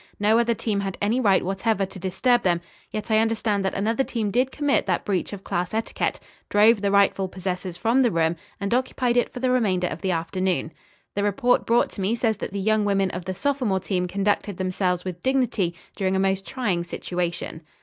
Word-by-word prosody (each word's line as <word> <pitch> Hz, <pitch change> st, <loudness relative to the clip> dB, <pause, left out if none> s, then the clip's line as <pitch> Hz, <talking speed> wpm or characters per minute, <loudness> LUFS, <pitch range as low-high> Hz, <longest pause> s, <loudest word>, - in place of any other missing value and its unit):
No 215 Hz, +3 st, +4 dB
other 235 Hz, 0 st, +2 dB
team 210 Hz, -2 st, -1 dB
had 195 Hz, -1 st, -3 dB
any 215 Hz, +5 st, +1 dB
right 200 Hz, -8 st, +3 dB
whatever 195 Hz, +2 st, 0 dB
to 190 Hz, 0 st, -10 dB
disturb 240 Hz, +7 st, +2 dB
them, 175 Hz, -2 st, +2 dB, 0.3 s
yet 215 Hz, +1 st, -5 dB
I 215 Hz, -, +5 dB
understand 220 Hz, -2 st, +1 dB
that 190 Hz, -, -1 dB
another 225 Hz, +6 st, +1 dB
team 220 Hz, -6 st, -2 dB
did 250 Hz, +4 st, +1 dB
commit 290 Hz, -5 st, +1 dB
that 180 Hz, -, 0 dB
breach 190 Hz, -3 st, -1 dB
of 200 Hz, -2 st, -7 dB
class 175 Hz, +4 st, -2 dB
etiquette, 225 Hz, -, -1 dB, 0.3 s
drove 210 Hz, +1 st, +5 dB
the 200 Hz, -, +1 dB
rightful 200 Hz, -1 st, +3 dB
possessors 185 Hz, -1 st, -4 dB
from 230 Hz, +7 st, +2 dB
the 245 Hz, -, +4 dB
room 165 Hz, -3 st, +1 dB, 0.2 s
and 200 Hz, +2 st, -1 dB
occupied 250 Hz, -1 st, +1 dB
it 245 Hz, -, +2 dB
for 250 Hz, -, -7 dB
the 255 Hz, 0 st, +1 dB
remainder 195 Hz, -8 st, +2 dB
of -, -, -4 dB
the 190 Hz, -, -1 dB
afternoon. 180 Hz, 0 st, -1 dB, 0.4 s
The 200 Hz, -, -1 dB
report 205 Hz, +5 st, +2 dB
brought 235 Hz, +1 st, +3 dB
to 200 Hz, -, -6 dB
me 200 Hz, +5 st, +1 dB
says 225 Hz, -3 st, 0 dB
that -, -, -5 dB
the 200 Hz, -, -3 dB
young 215 Hz, +2 st, +2 dB
women 195 Hz, -2 st, +1 dB
of 180 Hz, 0 st, -6 dB
the 185 Hz, 0 st, -3 dB
sophomore 245 Hz, -3 st, 0 dB
team 180 Hz, -1 st, -1 dB
conducted 200 Hz, 0 st, 0 dB
themselves 185 Hz, -1 st, -1 dB
with 180 Hz, -2 st, -5 dB
dignity 240 Hz, -10 st, +1 dB, 0.2 s
during 190 Hz, -1 st, 0 dB
a -, -, +1 dB
most 195 Hz, 0 st, 0 dB
trying 210 Hz, -10 st, -1 dB
situation." 175 Hz, -2 st, -4 dB
200 Hz, 210 wpm, -24 LUFS, 185-230 Hz, 0.4 s, I